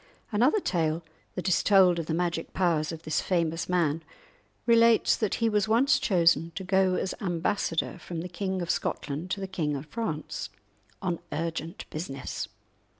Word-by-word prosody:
Another 245 - +3
tale 165 - 0 0.3
that 180 - -3
is 185 - +3
told 185 -4 +5
of 165 - -4
the 160 - -1
magic 170 -1 -2
powers 170 -4 +1
of 165 -1 -8
this 155 - 0
famous 170 -2 0
man 165 -3 +1 0.6
relates 230 -1 +5
that 215 -3 0
he 230 - +1
was 210 -2 +2
once 235 +6 +4
chosen 170 - +3
to 190 - -4
go 190 0 +3
as 190 - -1
ambassador 175 -2 -1
from 170 -2 -5
the 180 - -5
King 190 +1 -3
of 170 - 0
Scotland 150 +5 -3
to 200 - -2
the 195 - -3
King 165 -6 -2
of 140 +1 -5
France 155 -3 -4 0.5
on 175 -3 -1
urgent 165 +1 -4
business. 140 -4 -4
175 Hz, 165 wpm, -28 LUFS, 165-195 Hz, 0.6 s, told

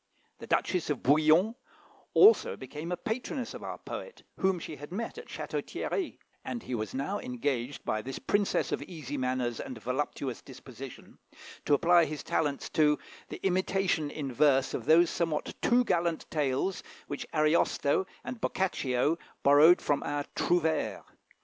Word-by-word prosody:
The - - -9
Duchess 180 -4 0
of 150 - -2
Bouillon 155 - +4 0.6
also 435 +3 +6
became 150 +6 -7
a 180 - -1
patroness 240 - -4
of - - -8
our - - -5
poet, 485 - -8
whom 190 -1 +2
she 155 -2 -7
had 145 +3 -10
met 230 - -4
at 470 - -11
Château - - -4
Thierry; 380 - -3 0.3
and 240 - -5
he - - -5
was 110 -2 -3
now 145 +10 -2
engaged 145 - -3
by 110 - 0
this 135 +4 -6
princess 205 -1 0
of - - -1
easy 150 -6 -7
manners 125 -3 -1
and 125 - -6
voluptuous 125 +2 -3
disposition, 130 0 -11 0.5
to 145 - +5
apply 170 +3 +5
his 150 -1 -5
talents 145 -3 -1
to, 150 -1 +3 0.3
the - - -7
imitation 185 -4 +1
in 140 -3 -5
verse 135 -1 +3
of 115 - -3
those 165 +2 +5
somewhat 165 -3 -1
too 245 +1 +4
gallant 170 -6 0
tales 150 +5 0 0.2
which 145 - -5
Ariosto 155 +2 +2 0.2
and 240 -1 -6
Boccaccio 150 -5 0 0.2
borrowed 150 +5 +7
from 145 - +1
our 145 0 -2
Trouvères. 160 -3 +1
155 Hz, 155 wpm, -30 LUFS, 135-180 Hz, 0.6 s, borrowed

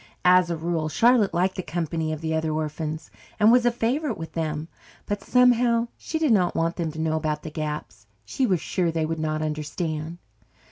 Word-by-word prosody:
As 180 -1 +6
a 170 - -1
rule, 160 -1 -1
Charlotte 230 +2 +4
liked 185 +2 0
the - - -1
company 160 -1 -2
of 155 0 -4
the 160 -1 -2
other 160 0 0
orphans 155 0 -4 0.3
and 215 +1 +6
was 245 0 +5
a - - +4
favourite 245 +3 -1
with 165 0 -7
them. 155 -1 -3 0.4
But, 205 -1 -3
somehow, 240 -2 +3
she 320 - -4
did 315 -4 +2
not 185 -5 +3
want 165 +1 0
them 165 -3 -2
to 160 - -7
know 160 0 0
about 155 -1 -2
the 160 - -6
gaps. 150 -8 -5 0.2
She 255 - 0
was 185 -5 +2
sure 175 -2 0
they 160 -1 -1
would 165 0 -3
not 155 0 -1
understand. 155 +1 -3
165 Hz, 200 wpm, -25 LUFS, 155-205 Hz, 0.4 s, As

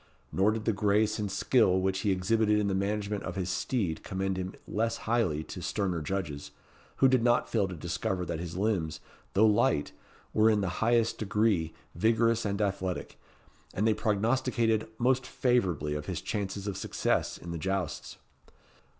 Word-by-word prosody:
Nor 95 +2 +3
did 110 0 -2
the 115 - +2
grace 105 +2 +2
and 105 -2 -2
skill 95 -2 +3
which 95 0 0
he 100 - 0
exhibited 105 +3 +2
in 105 - +1
the 100 - 0
management 100 +1 -1
of 90 - -5
his 95 -1 -2
steed 95 -4 -1
commend 95 0 -2
him 95 0 -4
less 115 +2 -1
highly 110 -10 +1
to 90 - -8
sterner 90 -2 -1
judges, 75 -4 -4 0.5
who 135 - +5
did 130 -2 +3
not 120 0 +3
fail 105 -4 +2
to 90 - -6
discover 90 +3 -2
that 80 - -3
his 85 0 -5
limbs, 95 -6 0 0.3
though 105 +3 +5
light, 105 -8 +2 0.4
were 110 +1 +5
in 105 -2 +3
the 95 - 0
highest 115 0 +2
degree 105 -5 +1 0.2
vigorous 115 +4 +2
and 100 +1 0
athletic, 95 -2 -3 0.6
and 105 +4 +1
they 110 - +4
prognosticated 110 +1 +1
most 125 +1 +2
favourably 90 - +1
of 75 0 -4
his - - -2
chances 100 -1 -3
of 100 -2 -3
success - - -1
in 85 - -8
the 85 - -4
jousts. 95 -1 -3
100 Hz, 170 wpm, -29 LUFS, 90-110 Hz, 0.6 s, who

